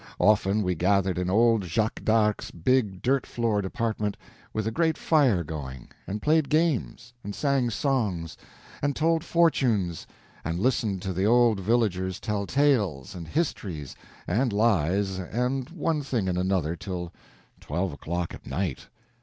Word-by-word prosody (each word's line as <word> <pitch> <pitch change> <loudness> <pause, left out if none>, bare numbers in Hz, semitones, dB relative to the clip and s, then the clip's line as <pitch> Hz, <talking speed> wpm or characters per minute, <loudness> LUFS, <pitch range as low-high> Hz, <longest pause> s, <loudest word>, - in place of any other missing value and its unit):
Often 105 0 +3
we 90 -1 +1
gathered 95 +1 +1
in 90 0 -1
old 115 +1 +4
Jacques 110 +6 -1
d'Arc's 110 -1 +2
big 100 +1 0
dirt 135 +1 +1
floored 110 -4 0
apartment, 105 0 -2 0.3
with 110 -1 -2
a 110 - 0
great 160 +5 +1
fire 130 - +3
going, 70 -5 -7 0.2
and 105 +2 -4
played 155 -1 +3
games, 155 -7 0
and 100 0 -6
sang 140 -4 +1
songs, 105 - -1 0.5
and 145 -1 0
told 165 +1 +2
fortunes, 125 - +1 0.4
and 85 +2 -2
listened 105 -5 0
to 95 -1 -2
the 95 +3 0
old 120 -2 +4
villagers 95 -4 0
tell 100 -2 -2
tales 110 - +1
and 85 -3 -8
histories 95 - -3 0.3
and 120 +7 +1
lies 100 -2 +1
and 125 +8 -2
one 165 -2 -1
thing 120 -8 -1
and 90 -1 0
another 90 -3 0
till 90 -1 -6 0.5
twelve 85 +4 -2
o'clock 85 +4 -4
at - - -11
night. 90 -7 -3
105 Hz, 145 wpm, -26 LUFS, 90-125 Hz, 0.5 s, old